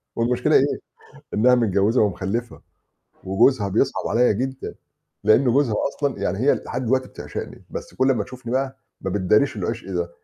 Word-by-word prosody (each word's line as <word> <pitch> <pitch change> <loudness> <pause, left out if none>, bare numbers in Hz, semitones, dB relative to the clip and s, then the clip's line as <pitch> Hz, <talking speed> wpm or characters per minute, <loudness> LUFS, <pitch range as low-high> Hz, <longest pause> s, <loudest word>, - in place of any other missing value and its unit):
والمشكلة 120 +1 +1
إيه؟ - - +3 0.5
إنها 125 +4 +5
متجوزة 110 0 +2
ومخلّفة، 105 +4 -2 0.6
وجوزها 100 +3 +3
بيصعب - - 0
عليّ 120 -2 +3
جدًا، 130 +4 -4 0.5
لأن 110 +5 +5
جوزها 125 -2 +2
أصلًا 140 -5 -3
يعني 100 0 -1
هي 135 +5 +3
لحد 125 +1 -5
دلوقتي 130 +2 +1
بتعشقني، - - -8
بس - - -7
كل 130 +1 +2
أمّا 110 -6 +1
تشوفني 125 0 -8
بقى 135 0 -1 0.2
ما 95 - -3
بتداريش 105 +7 +2
العشق 110 +2 -4
ده. 85 -1 -2
115 Hz, 150 wpm, -22 LUFS, 100-130 Hz, 0.6 s, إنها